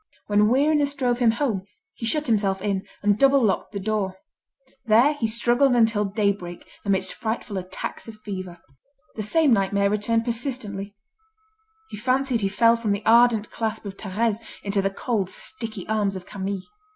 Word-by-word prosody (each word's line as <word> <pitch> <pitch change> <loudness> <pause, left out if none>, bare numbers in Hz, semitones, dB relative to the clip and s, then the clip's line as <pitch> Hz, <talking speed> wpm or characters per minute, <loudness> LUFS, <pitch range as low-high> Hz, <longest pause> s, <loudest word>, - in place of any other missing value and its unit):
When 210 0 +3
weariness 285 +2 +2
drove 245 -3 0
him 240 -2 +4
home, 225 -4 0 0.3
he 230 - -5
shut 300 +5 +1
himself 200 -5 +1
in, 195 -1 -2 0.2
and 205 0 +2
double 275 0 +5
locked 205 -4 0
the 200 - -4
door. 195 -2 -2 0.7
There 235 +7 +5
he 255 -6 -1
struggled 240 +4 +2
until 225 -3 +3
daybreak 200 -3 -2 0.2
amidst 195 -2 0
frightful 220 -1 -4
attacks 185 +4 -6
of 225 - -9
fever. 185 -4 -7 0.6
The 220 - -3
same 290 +5 +3
nightmare 200 -1 +2
returned 225 +2 0
persistently: 225 -5 -3 1.0
he - - -6
fancied 255 +1 +1
he 195 - +1
fell 230 +3 +4
from 220 -3 0
the 200 +1 -4
ardent 230 -1 +4
clasp 220 -1 -3
of 195 -1 -6
Thérèse 215 +2 -1 0.3
into 200 0 0
the 195 - +1
cold, 195 -1 -2
sticky 225 - -6
arms 210 -2 0
of 185 -1 -7
Camille. 195 -1 -4
215 Hz, 165 wpm, -24 LUFS, 200-235 Hz, 1.0 s, double